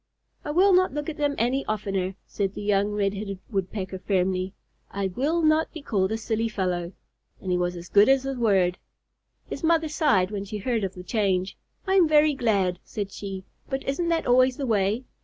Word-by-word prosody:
"I - - -6
will 370 +6 +4
not 365 -5 +3
look 295 +1 -3
at 315 - -6
them 290 -1 0
any 255 +4 +1
oftener," 195 -3 -2
said 195 -1 -3
the - - -5
young 205 0 +2
Red 205 -1 0
headed 200 -1 -5
Woodpecker, 190 -1 -3
firmly. 185 0 -1 0.3
"I 195 -1 -2
will 295 - 0
not 310 +1 +3
be 320 -4 -8
called 195 -6 0
a 220 - 0
silly 225 0 -1
fellow." 180 -4 -2 0.5
And 185 - -4
he 180 - +2
was 175 0 -1
as 175 0 -8
good 205 +6 +5
as 270 -1 +4
his 270 0 -3
word. 190 -6 +2 0.7
His - - -6
mother 325 -1 +2
sighed 215 - +2
when 200 -2 -3
she 210 +2 -6
heard 225 +1 -1
of 190 -1 -3
the 180 - -8
change. 190 -3 0 0.3
"I 380 - 0
am 355 -4 +6
very 305 0 +4
glad," 200 -8 +1
said 200 -2 -5
she. 195 -2 -6 0.3
"But 270 -1 -2
isn't 335 +5 -1
that 330 -1 +1
always 255 +1 +4
the 275 - -2
way? 215 +1 +1
210 Hz, 205 wpm, -25 LUFS, 190-275 Hz, 0.7 s, am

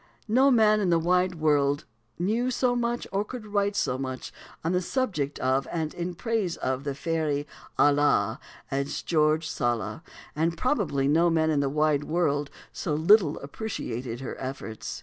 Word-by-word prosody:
No 255 +6 +5
man 215 -4 +5
in 195 -3 +1
the 170 - +4
wide 180 +2 +2
wide - - -12
world 145 -1 +2 0.3
knew 220 +8 0
so 250 0 +1
much, 240 0 -1
or 195 +2 0
could 235 +1 -8
write 205 -1 0
so 130 -9 0
much, 130 -1 -5 0.3
on 165 - 0
the 180 0 +1
subject 180 - -1
of 130 +1 +1
and 160 -2 -2
in 175 0 -4
praise 215 -3 -1
of 130 +2 -2
the 140 -1 -2
fairy 155 -2 -1 0.3
"Ala," 145 0 +3 0.3
as 140 +1 -2
George 155 -1 +2
Sala; 120 -6 -2 0.3
and 165 +2 0
probably 165 - +1
no 165 +4 +4
man 160 -1 +2
in 150 - +2
the 140 -1 +1
wide 150 0 +1
wide - - -12
world 145 -4 +1 0.2
so 150 - -2
little 165 0 +4
appreciated 130 - -5
her 135 - -5
efforts. 130 -4 -6
160 Hz, 170 wpm, -27 LUFS, 140-200 Hz, 0.3 s, No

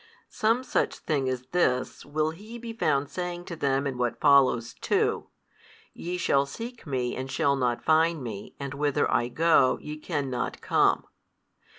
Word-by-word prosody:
Some 230 +2 +1
such - - 0
thing 140 -4 -1
as 130 -1 -3
this 130 -8 0
will 155 +2 0
He 210 +8 -10
be 235 -1 -7
found 145 -9 +1
saying 175 +3 -5
to 170 - -6
them 140 -2 0
in 130 -3 -3
what 120 -1 -1
follows 130 -5 +4
too, - - 0 0.7
Ye 180 +1 -4
shall 140 -5 +2
seek 230 - -8
Me 125 -3 -1
and 130 +1 -5
shall 140 0 +2
not 125 -3 -1
find 160 -1 +3
Me, 105 -4 -7
and 140 -1 -5
whither 145 -1 +1
I 120 - +2
go, 155 -1 +3
YE 150 0 -7
cannot 140 -6 -3
come. - - +2
145 Hz, 165 wpm, -27 LUFS, 130-170 Hz, 0.7 s, follows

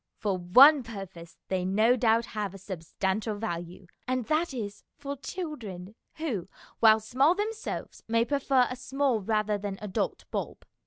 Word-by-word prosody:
For 200 -3 -1
one 255 - +7
purpose 195 -7 -9
they 185 -1 -1
no 215 +6 +3
doubt 230 -1 +3
have 205 -4 -4
a - - -7
substantial 190 +3 -3
value, 180 -3 -5 0.2
and 255 -2 -1
that 315 +4 +1
is 210 -6 -6
for 285 -1 -5
children, 245 - -6 0.2
who, 255 - -3 0.3
while 220 -1 +7
small 260 +9 +2
themselves, 430 +2 -4
may 230 +1 +2
prefer 270 -2 +2
a 255 - -5
small 265 -2 0
rather 210 0 0
than 200 -1 -4
an - - -14
adult 190 - -2
bulb. - - -4
220 Hz, 155 wpm, -28 LUFS, 195-265 Hz, 0.3 s, one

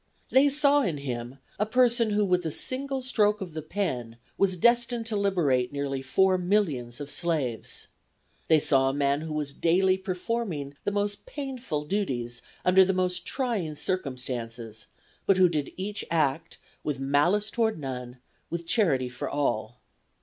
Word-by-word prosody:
They 275 +2 +6
saw 285 0 +4
in 175 - -1
him 125 -2 -5 0.2
a 210 - +3
person 240 -1 +3
who 210 0 +2
with 180 -1 +2
a 160 - -1
single 265 - -3
stroke 210 -5 +2
of 185 -5 -6
the 155 - -4
pen 145 - -3 0.2
was 190 -2 +2
destined 235 +3 +3
to 225 -1 -2
liberate 165 -12 +1
nearly 140 -1 -2
four 185 +8 +3
millions 160 - 0
of 145 -1 -6
slaves. 145 -8 -2 0.6
They 160 -1 +6
saw 135 -2 +3
a 135 - -2
man 140 0 +1
who 160 0 -5
was 150 -2 -3
daily 185 +4 +3
performing 185 -6 -3
the - - +1
most 205 0 -2
painful 255 - -4
duties 125 - -2 0.2
under 185 +1 +7
the 190 +1 +1
most 180 -1 0
trying 220 - -1
circumstances, 125 - -4 0.4
but 195 - +5
who 185 -1 +7
did 150 -5 -2
each 200 +2 -4
act 160 0 0 0.3
"with 145 -3 -2
malice 150 +10 +2
toward 225 -4 +1
none; 125 -3 -6 0.3
with 170 0 -4
charity 160 - +2
for 125 - -5
all." 120 -5 -1
170 Hz, 155 wpm, -27 LUFS, 135-205 Hz, 0.6 s, under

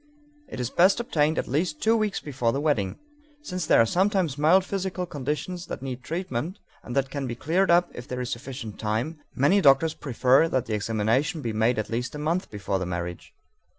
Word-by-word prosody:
It - - -8
is 125 0 -2
best 185 +6 +4
obtained 155 -9 +1
at - - -1
least 150 +3 -1
two 225 +1 +3
weeks 215 -3 0
before 130 -5 -1
the 135 - -1
wedding. 140 -11 0 0.5
Since 185 - -4
there - - +5
are 115 - +6
sometimes 185 - +1
mild 165 +6 +4
physical 190 -2 -3
conditions 150 +4 -4
that - - -6
need 130 -2 -5
treatment 165 - -4 0.2
and 120 - -7
that 135 -1 0
can 140 -1 -3
be 120 - -4
cleared 175 +10 +1
up 175 +1 +4
if 120 - -9
there 125 - -4
is 125 -1 -3
sufficient 120 -4 -6
time, 115 +9 -2 0.2
many 185 +10 +4
doctors 145 +1 +5
prefer 135 +2 +3
that 130 -5 0
the 110 - -4
examination 115 - 0
be 115 - -2
made 110 +3 +2
at 110 +1 -3
least 120 +5 -2
a - - -4
month 160 +5 -1
before 100 -2 -2
the 95 - -2
marriage. 85 0 -5
140 Hz, 205 wpm, -26 LUFS, 120-175 Hz, 0.5 s, are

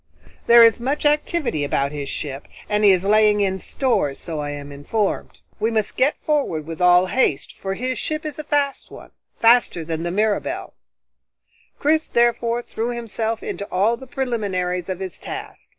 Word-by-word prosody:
There 235 0 +9
is 230 0 +5
much 275 +5 -2
activity 295 - +1
about 140 0 0
his 145 -2 -5
ship, 140 -2 -5 0.2
and 210 0 0
he 205 - +7
is 185 -1 +3
laying 210 0 +4
in 190 -1 0
stores, 185 - 0
so 160 -3 -5
I 145 0 -3
am 145 0 -7
informed. 195 +9 -3 0.2
We 220 +2 +1
must 220 -2 -1
get 275 +4 +2
forward 275 - 0
with 165 +1 -7
all 180 0 +6
haste, 185 - 0
for 195 0 -4
his 255 +4 -3
ship 310 0 -3
is 305 0 -5
a - - -4
fast 290 -2 -1
one - - -12 0.3
faster 230 -8 +3
than 160 0 -3
the 170 - -2
Mirabelle." 210 +3 -1 1.0
Chris 315 +2 +1
therefore 235 0 +1
threw 230 +1 -3
himself 230 -1 -3
into 200 - -4
all 205 +6 +2
the 265 +3 -12
preliminaries 190 -8 -2
of 185 -1 -3
his 190 -3 -6
task. - - -8
210 Hz, 175 wpm, -22 LUFS, 180-240 Hz, 1.0 s, There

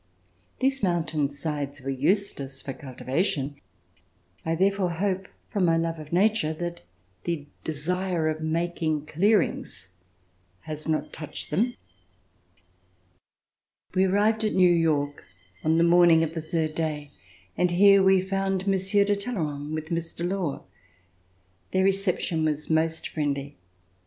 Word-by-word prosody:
These 270 +1 +1
mountain 160 -6 +1
sides 145 -1 -4
were 135 +1 -4
useless 140 -2 -1
for 135 - -4
cultiva 130 +4 -2
tion. 145 -6 -2 0.9
I 165 0 0
therefore 195 +1 +2
hope, 190 +2 -1 0.2
from 200 - 0
my 165 -1 +3
love 165 0 -1
of 150 -1 -10
nature, 185 -3 +2
that 175 +1 -5 0.4
the 165 -4 -2 0.2
desire 170 +2 -1
of 155 0 -2
making 160 -1 -1
clearings 175 - 0 0.7
has 155 +4 -7
not 155 -1 -1
touched 155 -2 -6
them. 230 +10 +1 2.2
We 190 +1 +3
arrived 210 +3 +2
at 215 - 0
New 180 -2 +6
York 150 -4 +1 0.4
on 160 +1 +3
the 165 - +4
morning 170 -1 +6
of 160 0 -2
the 165 - -3
third 160 -1 -1
day 150 -3 -3 0.4
and 180 - +2
here 195 +3 +6
we 190 -1 +5
found 195 0 -1
Monsieur 195 +1 +3
de 205 0 +2
Talley 210 +4 -4
rand 145 +2 -5
with 155 0 -5
Mr. 170 0 -2
Law. 180 -6 -2 1.1
Their 190 0 +2
reception 190 -4 +1
was 155 0 -1
most 160 +1 +1
friendly. 145 -2 -2
165 Hz, 135 wpm, -26 LUFS, 155-190 Hz, 2.2 s, New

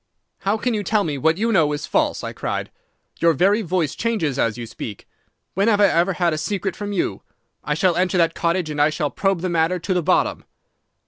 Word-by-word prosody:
"'How 200 +3 0
can 245 +2 -1
you 210 - -1
tell 205 +1 +1
me 145 -5 -3
what 160 +3 +2
you 230 +3 0
know 160 -8 +3
is 145 - -4
false?' - - 0
I - - -5
cried. - - -4 0.5
'Your 170 -1 +4
very 195 +8 +3
voice 175 -5 -1
changes 185 - -1
as 115 0 +1
you 120 - -5
speak. 115 -2 -8 0.5
When 200 +4 +1
have 210 -3 +3
I 205 - +6
ever 175 +3 +2
had 175 -2 +1
a 155 - -2
secret 195 +3 -2
from 205 -1 -5
you? 200 - -2 0.4
I 150 - -1
shall 175 +2 +2
enter 185 +1 +1
that 165 -1 +3
cottage, 170 -1 -1
and 150 -1 -1
I 150 - +5
shall 150 -1 -2
probe 195 -3 0
the 185 - -1
matter 170 +1 +1
to 185 +2 -2
the 180 - +1
bottom. 180 +3 +1
175 Hz, 230 wpm, -21 LUFS, 155-200 Hz, 0.5 s, I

